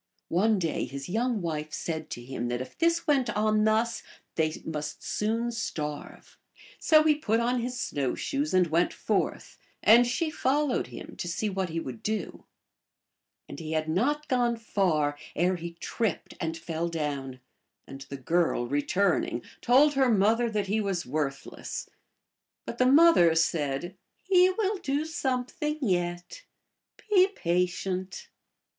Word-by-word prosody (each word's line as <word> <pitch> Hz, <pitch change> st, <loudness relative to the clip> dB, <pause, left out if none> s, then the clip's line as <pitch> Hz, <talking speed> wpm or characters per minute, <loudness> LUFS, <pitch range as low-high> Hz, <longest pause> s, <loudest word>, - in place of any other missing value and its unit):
One 210 Hz, +5 st, +3 dB
day 165 Hz, -4 st, -1 dB
his 135 Hz, +3 st, -7 dB
young 225 Hz, 0 st, 0 dB
wife 155 Hz, -2 st, -3 dB
said 160 Hz, -2 st, -4 dB
to 120 Hz, -, -6 dB
him 120 Hz, -1 st, -4 dB
that 120 Hz, 0 st, -2 dB
if 130 Hz, 0 st, -7 dB
this 335 Hz, 0 st, +1 dB
went 275 Hz, -6 st, +2 dB
on 215 Hz, 0 st, +2 dB
thus 225 Hz, +2 st, +1 dB, 0.3 s
they 155 Hz, -1 st, 0 dB
must 150 Hz, -2 st, -5 dB
soon 230 Hz, +3 st, -1 dB
starve. 150 Hz, -10 st, -6 dB, 0.4 s
So 310 Hz, -1 st, +5 dB
he 310 Hz, -1 st, +5 dB
put 230 Hz, -7 st, 0 dB
on 240 Hz, +1 st, +1 dB
his 250 Hz, +1 st, -4 dB
snow 140 Hz, -, -1 dB
shoes 285 Hz, +2 st, -2 dB
and 185 Hz, -1 st, +4 dB
went 170 Hz, +2 st, +1 dB
forth, -, -, -2 dB, 0.2 s
and 235 Hz, +3 st, +7 dB
she 310 Hz, +6 st, -1 dB
followed 285 Hz, 0 st, 0 dB
him -, -, -9 dB
to 175 Hz, -, -4 dB
see 205 Hz, +5 st, -2 dB
what 190 Hz, -1 st, -2 dB
he 165 Hz, +1 st, -2 dB
would 130 Hz, -7 st, -7 dB
do. 215 Hz, 0 st, -4 dB, 1.0 s
And -, -, -8 dB
he 160 Hz, -1 st, -5 dB
had 155 Hz, 0 st, 0 dB
not 280 Hz, -, 0 dB
gone 245 Hz, -3 st, +1 dB
far 160 Hz, -10 st, 0 dB, 0.2 s
ere 180 Hz, +3 st, +2 dB
he 170 Hz, 0 st, -7 dB
tripped 195 Hz, +1 st, -3 dB
and 165 Hz, 0 st, -2 dB
fell 165 Hz, +1 st, -3 dB
down, 140 Hz, -5 st, -4 dB, 0.5 s
and 135 Hz, 0 st, -10 dB
the 140 Hz, -, -5 dB
girl, 165 Hz, -2 st, +1 dB
returning, 145 Hz, 0 st, 0 dB, 0.2 s
told 280 Hz, +5 st, +5 dB
her 270 Hz, -2 st, +3 dB
mother 225 Hz, +3 st, +3 dB
that 210 Hz, -2 st, -1 dB
he 210 Hz, +3 st, 0 dB
was 195 Hz, -4 st, -2 dB
worthless. 140 Hz, 0 st, -4 dB, 0.8 s
But -, -, -7 dB
the 255 Hz, -, +5 dB
mother 275 Hz, -, +6 dB
said, 160 Hz, +1 st, 0 dB
" -, -, -52 dB
He 370 Hz, -1 st, +5 dB
will 400 Hz, +1 st, 0 dB
do 285 Hz, +1 st, -1 dB
something 300 Hz, 0 st, -2 dB
yet. 175 Hz, -, -2 dB, 0.7 s
Be 380 Hz, -3 st, +5 dB
patient." 180 Hz, +2 st, -2 dB
195 Hz, 150 wpm, -28 LUFS, 160-250 Hz, 1.0 s, and